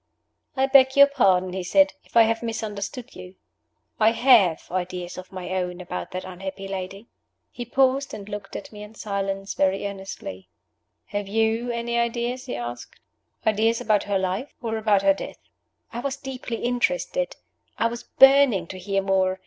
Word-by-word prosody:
"I 265 Hz, -, +4 dB
beg 265 Hz, -1 st, +5 dB
your 280 Hz, 0 st, +9 dB
pardon," 190 Hz, -10 st, +2 dB
he 190 Hz, -, -3 dB
said, 290 Hz, +11 st, +3 dB
"if -, -, -4 dB
I 230 Hz, -, +9 dB
have 225 Hz, 0 st, 0 dB
misunderstood 225 Hz, +2 st, -5 dB
you. 180 Hz, +1 st, -11 dB, 0.6 s
I 220 Hz, +1 st, +5 dB
have 230 Hz, -9 st, +5 dB
ideas 180 Hz, -1 st, -4 dB
of 185 Hz, +1 st, -10 dB
my 185 Hz, -1 st, -6 dB
own 180 Hz, -1 st, -2 dB
about 180 Hz, -, -5 dB
that 185 Hz, 0 st, -5 dB
unhappy 190 Hz, +1 st, -7 dB
lady." 195 Hz, +2 st, -6 dB, 0.5 s
He 240 Hz, -, -6 dB
paused 265 Hz, +3 st, +2 dB
and 200 Hz, -1 st, -8 dB
looked 205 Hz, -2 st, -7 dB
at -, -, -7 dB
me 210 Hz, -1 st, -10 dB
in 210 Hz, +1 st, -11 dB
silence 195 Hz, -1 st, -3 dB
very 195 Hz, +1 st, +1 dB
earnestly. 190 Hz, -, -7 dB, 0.6 s
"Have 205 Hz, -1 st, -4 dB
you 225 Hz, +3 st, 0 dB
any 235 Hz, 0 st, -1 dB
ideas?" 235 Hz, +2 st, -2 dB
he -, -, -3 dB
asked. 120 Hz, 0 st, -7 dB, 0.5 s
"Ideas 220 Hz, +2 st, +2 dB
about 215 Hz, -4 st, +2 dB
her 200 Hz, -1 st, 0 dB
life? 190 Hz, +8 st, -3 dB
or 225 Hz, -2 st, -3 dB
about 210 Hz, -3 st, +2 dB
her 195 Hz, 0 st, +5 dB
death?" 195 Hz, -, -8 dB, 0.6 s
I 235 Hz, -, -4 dB
was 275 Hz, +2 st, -3 dB
deeply 265 Hz, -3 st, -6 dB
interested; -, -, 0 dB, 0.4 s
I -, -, +1 dB
was 235 Hz, +1 st, -2 dB
burning 270 Hz, -9 st, +5 dB
to 185 Hz, -, -7 dB
hear 195 Hz, +1 st, -1 dB
more. 190 Hz, -1 st, +1 dB
210 Hz, 170 wpm, -24 LUFS, 190-240 Hz, 0.6 s, your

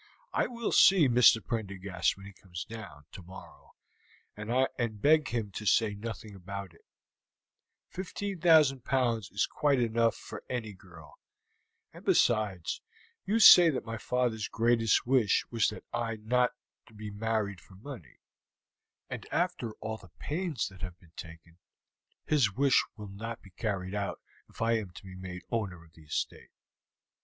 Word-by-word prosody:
I -, -, +1 dB
will 235 Hz, -2 st, -3 dB
see 190 Hz, -7 st, +6 dB
Mr. 120 Hz, -3 st, +5 dB
Prendergast 100 Hz, -6 st, -2 dB
when 95 Hz, -, -12 dB
he 100 Hz, -, -10 dB
comes 90 Hz, -2 st, -8 dB
down 110 Hz, -10 st, -10 dB
tomorrow, 95 Hz, +1 st, -13 dB, 0.6 s
and 115 Hz, 0 st, -1 dB
beg 155 Hz, +4 st, +4 dB
him 110 Hz, -4 st, -3 dB
to 105 Hz, +2 st, -6 dB
say 110 Hz, 0 st, +3 dB
nothing 110 Hz, 0 st, -7 dB
about 95 Hz, -1 st, -7 dB
it; -, -, -23 dB, 1.1 s
15,000 170 Hz, -8 st, +2 dB
pounds 120 Hz, -5 st, 0 dB
is 105 Hz, -, +1 dB
quite 145 Hz, -3 st, +1 dB
enough 115 Hz, -1 st, +2 dB
for -, -, -9 dB
any 115 Hz, -4 st, -3 dB
girl; 85 Hz, -6 st, -16 dB, 0.7 s
and -, -, -13 dB
besides, 105 Hz, -7 st, +1 dB, 0.4 s
you 205 Hz, +4 st, +1 dB
say 180 Hz, -6 st, +10 dB
that 135 Hz, -, -2 dB
my 115 Hz, -1 st, -5 dB
father's 120 Hz, -4 st, -1 dB
greatest 115 Hz, -2 st, +2 dB
wish 120 Hz, -5 st, +3 dB
was 115 Hz, -3 st, +2 dB
that -, -, -5 dB
I 115 Hz, -1 st, -1 dB
was 110 Hz, -, -15 dB
not 125 Hz, +2 st, +3 dB, 0.4 s
to 110 Hz, -, -19 dB
be 105 Hz, 0 st, -7 dB
married 105 Hz, -2 st, -2 dB
for 95 Hz, -, -18 dB
money, 100 Hz, -, -11 dB, 0.9 s
and -, -, -7 dB
after 175 Hz, -10 st, -1 dB
all 110 Hz, 0 st, -4 dB
the 95 Hz, -4 st, -16 dB
pains 155 Hz, -, -2 dB
that 95 Hz, -2 st, -15 dB
have 90 Hz, -2 st, -6 dB
been 85 Hz, -3 st, -22 dB
taken, 85 Hz, +1 st, -11 dB, 0.7 s
his 135 Hz, -10 st, +3 dB
wish 140 Hz, -2 st, +4 dB
will 105 Hz, -1 st, -8 dB
not 115 Hz, +4 st, -7 dB
be 95 Hz, -, -15 dB
carried 95 Hz, -1 st, -3 dB
out 100 Hz, -1 st, -3 dB, 0.3 s
if -, -, -5 dB
I 115 Hz, 0 st, +2 dB
am 105 Hz, -4 st, -7 dB
to -, -, -11 dB
be 95 Hz, -1 st, -10 dB
made 90 Hz, -1 st, -8 dB
owner 100 Hz, -7 st, -3 dB
of 80 Hz, -, -22 dB
the 80 Hz, -, -17 dB
estate." 75 Hz, -, -4 dB
110 Hz, 155 wpm, -30 LUFS, 95-125 Hz, 1.1 s, say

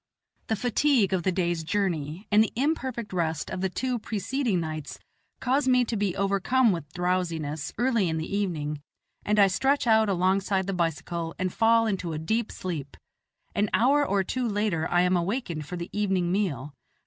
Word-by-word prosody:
The 220 Hz, -, +1 dB
fatigue 245 Hz, -2 st, +2 dB
of 185 Hz, -, +1 dB
the 185 Hz, -, +1 dB
day's 175 Hz, -2 st, -1 dB
journey, 170 Hz, -1 st, -2 dB
and 210 Hz, +1 st, +6 dB
the -, -, -3 dB
imperfect 260 Hz, -6 st, -1 dB
rest 160 Hz, -4 st, -1 dB
of 185 Hz, -, -3 dB
the 190 Hz, -, 0 dB
two 250 Hz, +5 st, -2 dB
preceding 220 Hz, 0 st, -1 dB
nights, 155 Hz, -2 st, -5 dB, 0.4 s
cause 265 Hz, +2 st, +1 dB
me 250 Hz, -1 st, +4 dB
to 230 Hz, -, -3 dB
be 200 Hz, -4 st, 0 dB
overcome 200 Hz, +5 st, +2 dB
with 165 Hz, -5 st, -4 dB
drowsiness, 170 Hz, -5 st, -2 dB
early 235 Hz, -6 st, +2 dB
in 160 Hz, -, -1 dB
the 160 Hz, +5 st, -3 dB
evening, 150 Hz, -7 st, -2 dB, 0.4 s
and 210 Hz, +1 st, +1 dB
I 200 Hz, -, +7 dB
stretch 270 Hz, +10 st, +1 dB
oat 220 Hz, -2 st, +4 dB
alongside 190 Hz, +1 st, +1 dB
the 195 Hz, -, -2 dB
bicycle 170 Hz, -1 st, -2 dB
and 185 Hz, -1 st, -2 dB
fall 230 Hz, 0 st, +4 dB
into 185 Hz, -6 st, -2 dB
a -, -, -3 dB
deep 220 Hz, +8 st, -1 dB
sleep. 155 Hz, -7 st, -5 dB, 0.6 s
An 205 Hz, +1 st, +1 dB
hour 280 Hz, +5 st, +4 dB
or 200 Hz, -8 st, +1 dB
two 250 Hz, +5 st, -2 dB
later 205 Hz, -6 st, 0 dB
I 175 Hz, -, +3 dB
am 180 Hz, +1 st, +3 dB
awakened 175 Hz, -, -2 dB
for 180 Hz, -, -5 dB
the 170 Hz, 0 st, -6 dB
evening 190 Hz, -4 st, 0 dB
meal. 150 Hz, -, -1 dB
190 Hz, 180 wpm, -27 LUFS, 170-225 Hz, 0.6 s, I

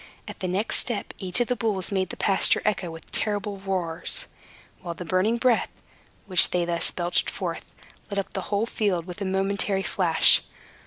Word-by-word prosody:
At -, -, -9 dB
the 185 Hz, -, -2 dB
next 190 Hz, +5 st, +1 dB
step, 235 Hz, -4 st, -1 dB
each 185 Hz, +1 st, +2 dB
of 240 Hz, -, +1 dB
the 250 Hz, -, 0 dB
bulls 210 Hz, -6 st, 0 dB
made 190 Hz, -2 st, 0 dB
the -, -, -7 dB
pasture 195 Hz, -1 st, +3 dB
echo 200 Hz, -4 st, 0 dB
with 165 Hz, 0 st, -10 dB
a -, -, -27 dB
terrible 205 Hz, -1 st, -2 dB
roar, 180 Hz, -4 st, -3 dB, 0.8 s
while 170 Hz, -2 st, -5 dB
the 180 Hz, -, -7 dB
burning 185 Hz, +7 st, +1 dB
breath, 240 Hz, -1 st, +2 dB, 0.6 s
which 185 Hz, -3 st, +6 dB
they 175 Hz, -1 st, 0 dB
thus 170 Hz, -1 st, 0 dB
belched 175 Hz, 0 st, 0 dB
forth, -, -, -4 dB, 0.4 s
lit 200 Hz, -, -4 dB
up 195 Hz, -, -3 dB
the 190 Hz, -, -2 dB
whole 205 Hz, +2 st, +1 dB
field 200 Hz, -7 st, -1 dB
with 180 Hz, +2 st, -9 dB
a -, -, -1 dB
momentary 195 Hz, +1 st, 0 dB
flash. 175 Hz, -5 st, +4 dB
190 Hz, 190 wpm, -25 LUFS, 180-205 Hz, 0.8 s, which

